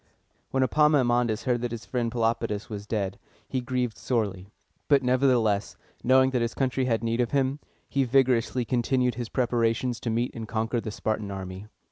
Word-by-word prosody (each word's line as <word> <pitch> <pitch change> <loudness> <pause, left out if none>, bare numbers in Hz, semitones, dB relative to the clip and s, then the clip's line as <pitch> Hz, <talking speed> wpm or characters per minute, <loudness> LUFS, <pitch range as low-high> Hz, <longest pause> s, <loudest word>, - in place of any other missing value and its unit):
When 135 0 +1
Epaminondas 125 -6 +3
heard 120 -2 0
that 120 - -1
his 115 0 -6
friend 120 -2 -1
Pelopidas 115 -2 -1
was 105 0 -6
dead, 100 -4 -2 0.3
he 130 - -2
grieved 125 -2 -2
sorely; 100 -6 -2 0.4
but 140 -2 +4
nevertheless, 125 -5 +2 0.3
knowing 130 +1 +5
that 125 -2 0
his 115 0 -1
country 130 -1 0
had 115 -3 0
need 115 +1 +1
of 120 - 0
him, 135 0 0 0.3
he 140 - +1
vigorously 125 -1 +2
continued 125 +1 +1
his 120 0 -5
preparations 120 -1 0
to 120 - -3
meet 120 +2 0
and 115 -1 -6
conquer 115 +1 -1
the 110 - -5
Spartan 110 0 -2
army. 95 +1 -6
120 Hz, 170 wpm, -27 LUFS, 110-130 Hz, 0.4 s, knowing